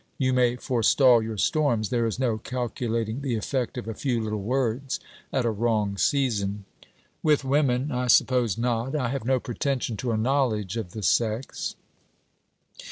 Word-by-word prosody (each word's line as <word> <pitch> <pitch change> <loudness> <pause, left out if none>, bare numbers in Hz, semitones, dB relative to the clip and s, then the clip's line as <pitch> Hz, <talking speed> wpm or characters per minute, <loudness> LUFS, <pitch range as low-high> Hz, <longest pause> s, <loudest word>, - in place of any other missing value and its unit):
You 130 -1 +1
may 125 -1 +3
forestall 125 0 +4
your 110 -1 -4
storms. 120 -4 +1
There 120 -2 +1
is 115 - -3
no 120 -4 0
calculating 115 -1 -3
the 135 -4 -1
effect 125 +3 -2
of 120 - -5
a 115 - -3
few 125 +1 -1
little 110 -2 -3
words 130 +3 -1 0.3
at 130 - 0
a 115 - +2
wrong 105 -2 0
season.' 105 -6 0 0.6
'With 150 -3 +3
women! 135 0 +1
I 125 0 -1
suppose 120 -3 +3
not. 120 +3 -1
I 130 -5 0
have 135 -2 -3
no 130 0 +2
pretension 125 -2 -2
to 120 +1 -2
a 110 - 0
knowledge 110 -5 0
of 110 -7 -5
the 110 - -6
sex.' 115 +5 0
120 Hz, 165 wpm, -26 LUFS, 110-130 Hz, 0.6 s, forestall